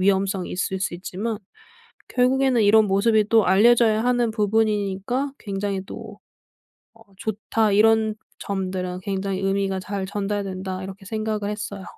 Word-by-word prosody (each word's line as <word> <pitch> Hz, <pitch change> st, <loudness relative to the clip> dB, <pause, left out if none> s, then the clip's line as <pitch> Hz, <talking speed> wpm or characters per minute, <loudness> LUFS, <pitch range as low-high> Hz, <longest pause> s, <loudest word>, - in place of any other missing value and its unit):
위험성이 195 Hz, 0 st, +1 dB
있을 190 Hz, +1 st, -2 dB
수 180 Hz, -, -2 dB
있지만 200 Hz, +5 st, -4 dB, 0.7 s
결국에는 255 Hz, -1 st, +2 dB
이런 215 Hz, +1 st, +6 dB
모습이 210 Hz, +2 st, +3 dB
또 225 Hz, -2 st, +5 dB
알려져야 220 Hz, +3 st, +4 dB
하는 245 Hz, -2 st, +2 dB
부분이니까 215 Hz, +4 st, 0 dB
굉장히 195 Hz, -1 st, -3 dB
또 220 Hz, 0 st, -9 dB, 0.8 s
'어 225 Hz, -, -21 dB, 0.2 s
좋다. 220 Hz, +1 st, -1 dB
이런 220 Hz, +1 st, +4 dB, 0.2 s
점들은 185 Hz, -2 st, -3 dB
굉장히 195 Hz, 0 st, -2 dB
의미가 195 Hz, -1 st, 0 dB
잘 190 Hz, 0 st, -4 dB
전달된다.' 195 Hz, -2 st, -3 dB
이렇게 195 Hz, +1 st, -9 dB
생각을 215 Hz, 0 st, -2 dB
했어요. 205 Hz, -2 st, -5 dB
205 Hz, 315 characters per minute, -23 LUFS, 195-220 Hz, 0.8 s, 이런